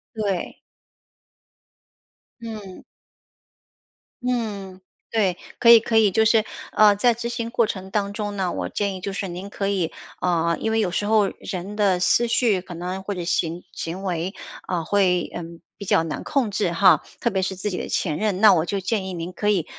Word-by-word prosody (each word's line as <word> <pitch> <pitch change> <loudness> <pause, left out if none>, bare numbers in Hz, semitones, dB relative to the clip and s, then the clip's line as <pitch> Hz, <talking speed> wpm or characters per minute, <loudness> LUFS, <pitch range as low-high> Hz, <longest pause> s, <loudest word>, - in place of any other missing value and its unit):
对。 200 -5 -2 1.8
嗯。 215 -5 -8 1.4
嗯， 205 -7 -3 0.3
对。 195 -6 +1 0.2
可 235 - +4
以 230 - +10
可 225 0 0
以 210 -3 +5
就 220 +3 +3
是， 220 -1 +4 0.3
呃， 210 -1 +6
在 240 +4 +3
执 235 +1 -4
行 235 -1 -3
过 235 -1 +2
程 190 -2 -5
当 200 0 -1
中 205 -1 -4
呢， 185 -2 0
我 - - -3
建 200 -2 -2
议 185 - -8
就 200 - -3
是 195 0 -3
您 180 +3 -7
可 195 -1 -3
以， 185 -5 0 0.3
呃， 170 -2 +1
因 220 - -1
为 225 - +2
有 190 -5 +1
时 205 +3 -1
候， 215 -1 +4
人 190 +2 -5
的 195 -4 +2
思 235 +6 +3
绪 225 -5 +2
可 180 -2 -10
能 180 +3 -4
或 200 +1 -4
者 175 - -4
行 170 0 -1
行 175 +4 -5
为， 180 0 -2 0.3
啊， 175 -3 -2
会， 180 -1 +2
嗯， 170 -1 -7 0.2
比 200 - -9
较 165 - +3
难 160 - -4
控 255 -7 0
制 195 -3 0
哈， 175 -3 +5 0.2
特 235 - 0
别 190 - 0
是 190 0 -2
自 195 +2 -3
己 180 - -3
的 - - -5
前 155 -5 -1
任。 205 -3 0
那 215 -2 +8
我 160 -3 +2
就 200 +2 -2
建 190 +1 -1
议 190 - -5
您 175 +1 -5
可 210 +4 -1
以， 185 -6 +2
195 Hz, 210 characters per minute, -23 LUFS, 180-215 Hz, 1.8 s, 以